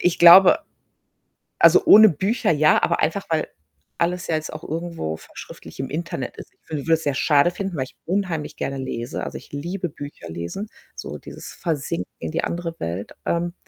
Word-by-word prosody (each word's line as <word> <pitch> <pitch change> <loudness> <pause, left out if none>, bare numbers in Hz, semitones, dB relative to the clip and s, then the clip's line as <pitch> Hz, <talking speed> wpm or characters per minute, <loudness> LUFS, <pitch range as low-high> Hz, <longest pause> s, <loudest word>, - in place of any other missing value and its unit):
ich 175 - +1
glaube 185 - +9 1.0
also, - - +6
ohne 215 0 +9
Bücher 195 +6 0
ja, 155 0 +4
aber - - +1
einfach, 180 +6 0
weil 160 -1 0 0.5
alles 180 +2 -1
ja 160 - 0
jetzt 155 0 -4
auch 155 +1 -8
irgendwo 165 - -4
verschriftlicht 80 - -12
im 135 - -3
Internet 150 -5 -4
ist. - - -11
Ich - - -42
wü 150 -3 -3
würde 165 - +2
es 160 - +1
sehr 145 - 0
schade 145 +3 +4
finden, 185 -2 -5
weil 130 - -1
ich - - -17
unheimlich 175 -4 -2
gerne 135 0 -3
lese. 120 -2 -4
Also, - - -5
ich - - -15
liebe 175 +5 -4
Bücher 145 - -9
lesen, 85 - -5 0.3
so - - -7
dieses - - -10
Versinken 140 - -3
in 80 -1 -5
die - - -1
andere 170 -1 -3
Welt. 85 +4 -5
Ähm 170 +1 -1
160 Hz, 190 wpm, -22 LUFS, 140-175 Hz, 1.0 s, glaube